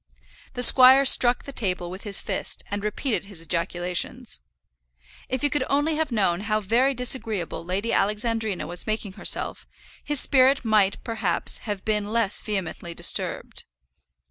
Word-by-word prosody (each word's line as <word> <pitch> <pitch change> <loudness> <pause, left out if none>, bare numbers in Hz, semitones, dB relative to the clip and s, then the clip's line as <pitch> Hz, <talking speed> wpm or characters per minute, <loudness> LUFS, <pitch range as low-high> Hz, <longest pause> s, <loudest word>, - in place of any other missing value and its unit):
The 245 - 0
squire 260 +2 +8
struck 245 -2 +5
the 280 - -9
table 180 -8 -3
with 190 +2 -8
his 200 -2 +1
fist, - - -3
and 205 0 -4
repeated 210 +2 -2
his 200 -4 -12
ejaculations. 175 - -2 0.9
If 260 +1 -3
he 290 - +3
could 290 -1 0
only 290 +3 +1
have 310 -2 -2
known 190 -6 0
how 215 +1 -1
very 240 +7 +1
disagreeable 225 -9 -2
Lady 190 +6 -3
Alexandrina 210 0 -1
was 175 +1 -6
making 215 -2 -3
herself, - - -1 0.4
his 295 -2 -1
spirit 265 -1 +2
might, 210 -3 +1
perhaps, 230 -2 -1
have 205 -2 -4
been 210 -1 -1
less 225 -3 0
vehemently 180 -4 -5
disturbed. - - -1
215 Hz, 145 wpm, -24 LUFS, 190-255 Hz, 0.9 s, squire